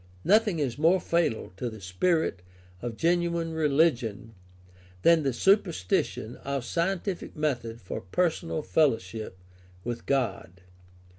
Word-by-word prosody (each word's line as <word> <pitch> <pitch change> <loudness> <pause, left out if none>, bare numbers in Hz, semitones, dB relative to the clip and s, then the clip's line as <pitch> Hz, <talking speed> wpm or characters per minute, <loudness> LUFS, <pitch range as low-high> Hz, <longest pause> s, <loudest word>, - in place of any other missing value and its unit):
Nothing 210 -2 +4
is 140 -4 -2
more 170 +4 +4
fatal 170 - 0
to 120 - -2
the 110 -1 -10
spirit 100 - 0 0.4
of 120 -2 -5
genuine 170 -1 +1
religion 140 -8 +1 0.7
than 170 -1 +6
the 140 -2 +1
substitution 125 - +1
of 140 -3 -3
scientific 180 - -2
method 120 -7 -2
for 90 - -6
personal 165 - -1
fellowship 110 -11 0 0.5
with 120 -1 -5
God. 120 -9 -1
145 Hz, 115 wpm, -28 LUFS, 115-170 Hz, 0.7 s, than